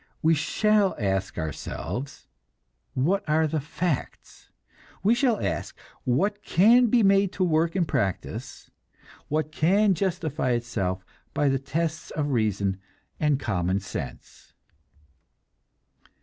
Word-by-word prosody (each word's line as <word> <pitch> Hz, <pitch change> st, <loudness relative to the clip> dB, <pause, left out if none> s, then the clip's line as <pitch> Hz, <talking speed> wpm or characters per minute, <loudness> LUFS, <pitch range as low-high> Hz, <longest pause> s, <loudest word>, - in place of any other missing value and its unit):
We 160 Hz, +1 st, +5 dB
shall 205 Hz, +5 st, +2 dB
ask 95 Hz, -2 st, -1 dB
ourselves, 90 Hz, -, -5 dB, 0.7 s
what 185 Hz, +10 st, +1 dB
are 160 Hz, +1 st, +3 dB
the 155 Hz, 0 st, -1 dB
facts. 155 Hz, +1 st, -4 dB, 0.5 s
We 210 Hz, +4 st, +5 dB
shall 240 Hz, -3 st, +2 dB
ask, -, -, -3 dB, 0.3 s
what 200 Hz, +12 st, +1 dB
can 225 Hz, +6 st, +5 dB
be 230 Hz, 0 st, +3 dB
made 195 Hz, -1 st, +4 dB
to 185 Hz, -, 0 dB
work 165 Hz, 0 st, +2 dB
in 180 Hz, -3 st, +2 dB
practice, 95 Hz, -, -3 dB, 0.6 s
what 155 Hz, +1 st, -1 dB
can 195 Hz, +6 st, +3 dB
justify 160 Hz, -7 st, -1 dB
itself 95 Hz, -6 st, -2 dB, 0.3 s
by 145 Hz, -, +3 dB
the 135 Hz, 0 st, +1 dB
tests 160 Hz, +4 st, -3 dB
of 145 Hz, -2 st, -2 dB
reason 100 Hz, -5 st, 0 dB, 0.4 s
and 150 Hz, -3 st, +2 dB
common 95 Hz, -6 st, 0 dB
sense. 95 Hz, -, -8 dB
155 Hz, 115 wpm, -26 LUFS, 120-195 Hz, 0.7 s, We